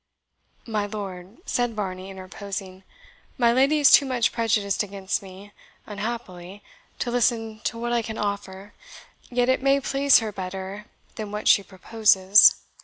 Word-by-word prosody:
"My 215 -3 -2
lord," 195 -2 -8
said 245 -2 -1
Varney 190 -2 -5
interposing, 190 0 -8 0.6
"my 235 -2 +3
lady 275 +4 +3
is 285 - +6
too - - +8
much 250 -3 +1
prejudiced 220 -4 0
against 200 -2 -3
me, 195 +1 -13 0.3
unhappily, 205 -3 -7 0.3
to 240 - -3
listen 225 -2 0
to 230 - -2
what 240 +1 -3
I 235 - +2
can 220 0 -7
offer, 200 -1 -5 0.6
yet 245 0 0
it 260 0 +2
may 275 +1 +3
please 275 0 +4
her 220 -2 -2
better 190 +2 -7 0.3
than 215 -2 -6
what 210 0 -4
she - - +6
proposes. 200 0 +4
210 Hz, 145 wpm, -24 LUFS, 195-235 Hz, 0.6 s, too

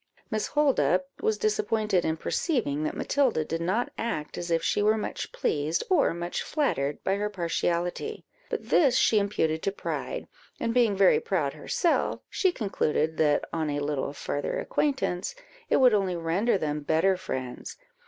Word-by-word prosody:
Miss 215 -1 0
Holdup 185 - +2 0.2
was 220 -1 +1
disappointed 215 -3 +1
in 160 0 0
perceiving 165 - -1
that - - -3
Matilda 255 - +1
did 165 +2 -3
not 190 +8 0
act 155 -10 -3
as 175 - -5
if 165 -1 +1
she 165 - +1
were 215 +1 +3
much 215 - -4
pleased, 150 +2 0
or 350 -6 +4
much 175 +1 -3
flattered, 145 - -1
by 195 +1 +1
her 210 +1 -1
partiality; 175 - -2 0.2
but - - -4
this 275 -6 +4
she 215 - +4
imputed 160 -6 0
to 195 - 0
pride, 200 - -4 0.3
and 230 - -1
being 235 -4 +3
very 195 -1 +5
proud 155 -8 -1
herself, 325 - 0
she 375 - +2
concluded 160 - -1
that, 150 -2 +2
on 160 -2 -1
a 145 0 -1
little 145 -1 -2
farther 145 0 -3
acquaintance, 265 - -1 0.3
it - - +4
would 255 -3 +6
only 195 -3 +1
render 175 +7 +1
them 150 -3 -2
better 160 +6 +2
friends. 130 -9 -5
185 Hz, 165 wpm, -27 LUFS, 155-220 Hz, 0.3 s, would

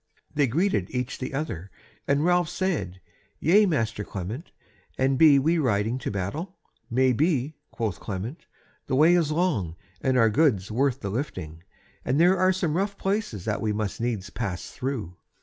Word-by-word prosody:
They 145 -2 +3
greeted 130 - +1
each 125 0 -3
the 130 - -4
other, 135 - -4 0.4
and 140 +3 +2
Ralph 175 -2 +3
said: 100 - -2 0.4
"Yea, 200 +6 +5
master 115 - -1
Clement, 105 - -6 0.5
and 135 +1 +2
be 145 0 +7
we 160 +5 +2
riding 115 -2 +1
to - - -3
battle?" 125 - -4 0.3
"Maybe," 130 +4 +1
quoth 110 -5 -3
Clement; 105 - -6 0.4
"the 130 - 0
way 155 +5 +6
is 165 -4 +2
long, 150 - 0 0.3
and 130 -1 +2
our 115 -2 +5
goods 115 - +2
worth 135 +3 +1
the 100 - -3
lifting, 80 - -4 0.4
and 135 +4 +1
there 180 +3 +6
are 185 +1 +4
some 175 -4 0
rough 200 +1 -1
places 195 - -2
that 105 -1 -1
we 110 -2 0
must 105 0 -3
needs 110 -5 -2
pass 100 -6 -4
through. 115 -10 -4
130 Hz, 165 wpm, -26 LUFS, 105-160 Hz, 0.5 s, be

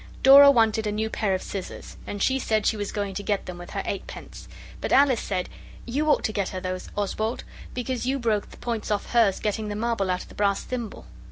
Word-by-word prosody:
Dora 280 +1 +10
wanted 225 -4 +3
a - - 0
new 220 +1 -2
pair 200 -3 0
of 185 - -4
scissors, 195 -2 -7
and 205 -1 -3
she 265 0 +2
said 220 -4 0
she - - +2
was 205 -1 -4
going 200 -2 -3
to 195 - -4
get 205 -1 -1
them 180 -1 -7
with 175 - -9
her 195 - -3
eight 200 - -4
pence. - - -10 0.3
But - - -3
Alice 270 -4 +5
said 185 -2 -2 0.4
'You 290 +6 -1
ought 295 - +3
to 215 - -1
get 200 -3 -1
her 185 - -5
those, 185 0 -5
Oswald, 215 +3 -2 0.3
because 250 0 -2
you 265 - +1
know - - -1
you - - -7
broke 220 -4 0
the - - -14
points 230 -3 -4
off 210 -1 -2
hers 225 -5 +3
getting 215 +1 -2
the 205 - -4
marble 220 -3 -1
out 180 0 -1
of - - -17
the - - -13
brass 200 -1 +1
thimble. 240 -4 -6
215 Hz, 250 wpm, -25 LUFS, 200-235 Hz, 0.4 s, Dora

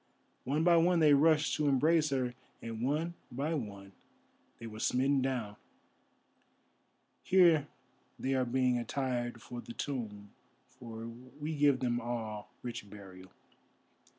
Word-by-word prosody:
One 145 +5 +1
by 170 0 +6
one 175 +2 +4
they 155 -3 +6
rushed 155 +1 +4
to 150 - +1
embrace 155 +3 +3
her, 130 -3 -1 0.3
and 115 -1 -6
one 155 +7 0 0.2
by 140 +6 -2
one 100 -8 -5 0.7
they 115 - -9
were 110 -1 -8
smitten 135 +4 +2
down. 120 -6 -2 1.6
Here 170 -6 +5 0.5
they 135 - -1
are 130 -1 +2
being 125 0 +1
attired 120 -2 -3
for 120 -1 -7
the 115 +1 -9
tomb, 105 -8 -5 0.4
for 115 -1 -9
we 130 +7 -7
give 145 -3 +3
them 120 -1 0
all 115 -3 -5
rich 120 -3 -6
burial." 95 -2 -12
130 Hz, 130 wpm, -32 LUFS, 115-145 Hz, 1.6 s, by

